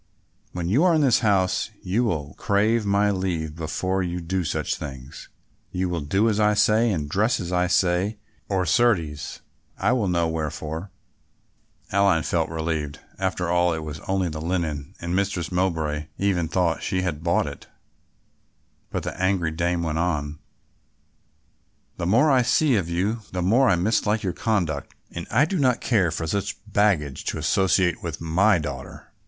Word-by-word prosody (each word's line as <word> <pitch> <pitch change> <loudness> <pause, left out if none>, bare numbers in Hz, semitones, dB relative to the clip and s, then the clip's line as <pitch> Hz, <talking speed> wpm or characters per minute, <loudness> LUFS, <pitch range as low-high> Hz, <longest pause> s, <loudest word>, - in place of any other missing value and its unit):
When 85 -1 -4
you 120 - +3
are 180 -2 +4
in 155 - +3
this 130 -5 +4
house 100 -5 +1
you 100 +7 +1
will 75 -10 -2
crave 105 +2 +1
my 100 +1 +3
leave 85 -5 -2
before 95 +4 -2
you 90 -1 -2
do 90 +2 -2
such 75 - -1
things; 65 -2 -9 0.4
you 90 0 -1
will 85 -2 -2
do 95 +10 +1
as 110 -2 +1
I 105 0 +3
say 110 +3 +4
and 80 -8 -1
dress 105 +10 +1
as 90 0 -4
I 90 0 +2
say 90 +4 +1 0.3
or, 95 -2 +1
certes, 85 - +1 0.4
I - - +1
will 120 -6 +1
know 85 -2 +1
wherefore." 80 +2 -4 1.0
Aline 95 -4 +3
felt 85 -2 0
relieved. 80 -3 -3 0.2
After 95 -2 -1
all 90 0 +3
it 80 -1 -4
was 75 0 -6
only 95 -1 +1
the 75 -1 -5
linen 80 -5 -3
and 85 +1 -2
Mistress 95 -4 -1
Mowbray 80 -5 -1
even 95 -4 +1
thought 85 0 0
she 95 -2 -1
had 80 -4 -3
bought 85 0 +2
it; - - -8 1.2
but - - -3
the - - -4
angry 95 -4 +1
dame 85 +1 -1
went 80 -1 -1
on; 75 -3 -1 1.6
"The 85 - -2
more 120 +10 +4
I 130 -2 +5
see 135 +2 +3
of 95 -5 0
you 95 +7 0
the 90 -1 -1
more 120 +8 +4
I 95 - +4
mislike 105 +3 +1
your 90 -3 -1
conduct 80 -9 -1 0.2
and 85 - -6
I 125 +7 +4
do 185 +2 -2
not 125 -3 +3
care 100 -8 +2
for 80 +1 -3
such 100 +5 -2
baggage 85 -10 +1
to - - -2
associate 95 -2 +2
with 80 -3 -5
my 90 +5 +3
daughter. 75 -3 -7
90 Hz, 170 wpm, -24 LUFS, 80-100 Hz, 1.6 s, I